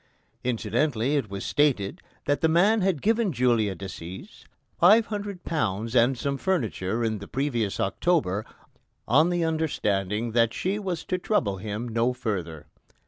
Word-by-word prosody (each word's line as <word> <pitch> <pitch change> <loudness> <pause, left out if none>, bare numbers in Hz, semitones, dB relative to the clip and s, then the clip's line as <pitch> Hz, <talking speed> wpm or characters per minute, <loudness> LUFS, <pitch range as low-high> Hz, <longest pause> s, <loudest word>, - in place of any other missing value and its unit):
Incidentally 125 +1 0
it 135 -8 -1
was 100 0 -5
stated 130 -10 +1 0.2
that 145 - 0
the 160 - +4
man 200 +7 +4
had 185 -7 0
given 225 -2 +2
Julia 120 - +1
Decies 95 -1 -9 0.4
£500 175 - +1
and 125 +2 +4
some 140 +3 -2
furniture 115 - -1
in 110 -2 -1
the 100 - -9
previous 120 -7 -1
October 105 - +1 0.6
on 155 +7 +4
the 175 -1 0
understanding 115 - -1
that 115 0 +2
she 195 +3 -1
was 185 -5 -4
to 185 - -1
trouble 115 - 0
him 105 +4 -4
no 115 +2 +1
further. 90 - -4
125 Hz, 140 wpm, -26 LUFS, 105-170 Hz, 0.6 s, the